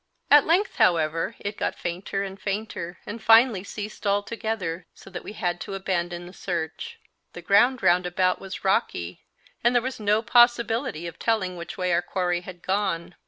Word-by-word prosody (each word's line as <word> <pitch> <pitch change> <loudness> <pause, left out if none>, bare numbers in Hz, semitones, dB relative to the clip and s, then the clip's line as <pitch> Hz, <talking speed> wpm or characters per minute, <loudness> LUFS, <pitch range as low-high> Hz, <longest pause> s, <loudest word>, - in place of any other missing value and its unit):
At 290 -1 +7
length, 370 +5 +2
however, 165 -1 +2
it 205 +1 -5
got - - -2
fainter 185 +3 -3
and 195 0 -8
fainter, 195 -4 -4
and 225 +2 -7
finally 225 -3 +5
ceased 210 +1 -6
altogether, 200 -4 -2
so 195 - -14
that 175 - -6
we - - -8
had 175 -4 -2
to 195 - -5
abandon 175 -2 -2
the 180 - -11
search; 190 - -5 0.3
the 175 - -8
ground 235 +8 +4
round 180 +1 +4
about 185 +1 +1
was 195 -1 -7
rocky, 90 - 0 0.4
and 240 +2 +3
there 245 - +5
was 260 -1 -4
no 210 +1 +2
possibility 235 - +3
of 170 - -8
telling 210 -6 0
which 170 -1 -8
way 180 -2 0
our 170 - +3
quarry 175 -1 -1
had 175 -1 -11
gone. 185 -3 -1
195 Hz, 175 wpm, -25 LUFS, 175-225 Hz, 0.4 s, At